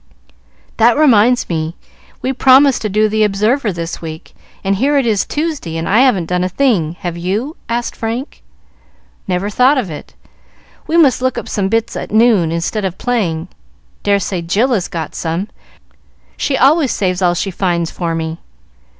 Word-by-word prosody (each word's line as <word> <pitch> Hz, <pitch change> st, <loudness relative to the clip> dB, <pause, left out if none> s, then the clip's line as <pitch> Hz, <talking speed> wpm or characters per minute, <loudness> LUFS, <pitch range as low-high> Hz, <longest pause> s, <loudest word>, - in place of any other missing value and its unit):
"That 230 Hz, +3 st, +4 dB
reminds 250 Hz, -4 st, +4 dB
me! 160 Hz, 0 st, -3 dB, 0.5 s
We 265 Hz, -, 0 dB
promised 265 Hz, +1 st, +5 dB
to 215 Hz, -, -2 dB
do 215 Hz, +2 st, +2 dB
the 215 Hz, 0 st, +1 dB
'Observer' 215 Hz, +4 st, +1 dB
this 170 Hz, -1 st, -5 dB
week, 160 Hz, -1 st, -8 dB, 0.3 s
and 195 Hz, 0 st, 0 dB
here 285 Hz, +6 st, +2 dB
it 275 Hz, -, +2 dB
is 215 Hz, -4 st, +1 dB
Tuesday 295 Hz, -, -3 dB
and 165 Hz, -, -3 dB
I 215 Hz, -, +3 dB
haven't 250 Hz, -10 st, +3 dB
done 180 Hz, +1 st, -1 dB
a 185 Hz, -, -1 dB
thing: 185 Hz, -, +1 dB
have 175 Hz, -2 st, -3 dB
you?" 205 Hz, -, -2 dB
asked 235 Hz, +1 st, -2 dB
Frank. 230 Hz, +5 st, -5 dB, 0.9 s
"Never 185 Hz, +1 st, -1 dB
thought 255 Hz, +6 st, +4 dB
of 210 Hz, -10 st, -2 dB
it. 150 Hz, -, -10 dB, 0.7 s
We 330 Hz, -, +1 dB
must 280 Hz, -7 st, +4 dB
look 260 Hz, 0 st, 0 dB
up -, -, -5 dB
some 195 Hz, -3 st, -1 dB
bits 225 Hz, +2 st, -1 dB
at -, -, -5 dB
noon 215 Hz, -7 st, +3 dB
instead 170 Hz, +6 st, -2 dB
of 190 Hz, -2 st, -3 dB
playing. 185 Hz, -9 st, -1 dB, 0.5 s
Dare 200 Hz, -1 st, +2 dB
say 185 Hz, -1 st, -3 dB
Jill 210 Hz, +10 st, +1 dB
has 190 Hz, -6 st, 0 dB
got 160 Hz, -3 st, -5 dB
some: 170 Hz, +5 st, -3 dB, 0.9 s
she 270 Hz, -, -1 dB
always 280 Hz, +1 st, +4 dB
saves 185 Hz, -1 st, -1 dB
all 175 Hz, -1 st, +2 dB
she 195 Hz, +3 st, -2 dB
finds 175 Hz, -2 st, -1 dB
for 170 Hz, -2 st, -3 dB
me." 160 Hz, 0 st, -4 dB
205 Hz, 175 wpm, -16 LUFS, 175-250 Hz, 0.9 s, promised